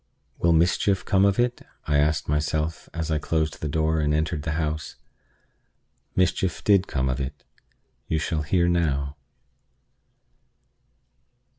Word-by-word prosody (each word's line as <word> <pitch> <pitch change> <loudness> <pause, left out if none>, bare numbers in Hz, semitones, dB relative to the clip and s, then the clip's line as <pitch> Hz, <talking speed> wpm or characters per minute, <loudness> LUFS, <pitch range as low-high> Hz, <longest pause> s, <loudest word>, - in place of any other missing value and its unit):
"Will 85 - +3
mischief 90 +4 +2
come 95 0 +3
of 100 -1 +2
it?" 120 0 +1 0.2
I 75 - +2
asked 75 0 +1
myself 75 +2 -1
as 80 -1 -3
I 75 - +1
closed 80 0 -1
the 75 - -2
door 80 +1 +1
and 75 0 +1
entered 80 0 -1
the 80 +1 -2
house. 75 -2 -3 1.2
Mischief 90 -1 +1
did 100 -2 +4
come 65 -1 -1
of 65 +2 -1
it. 70 +2 -6 0.6
You 80 - 0
shall 80 0 -1
hear 85 +3 +2
how. 75 -5 0
80 Hz, 135 wpm, -25 LUFS, 75-85 Hz, 1.2 s, did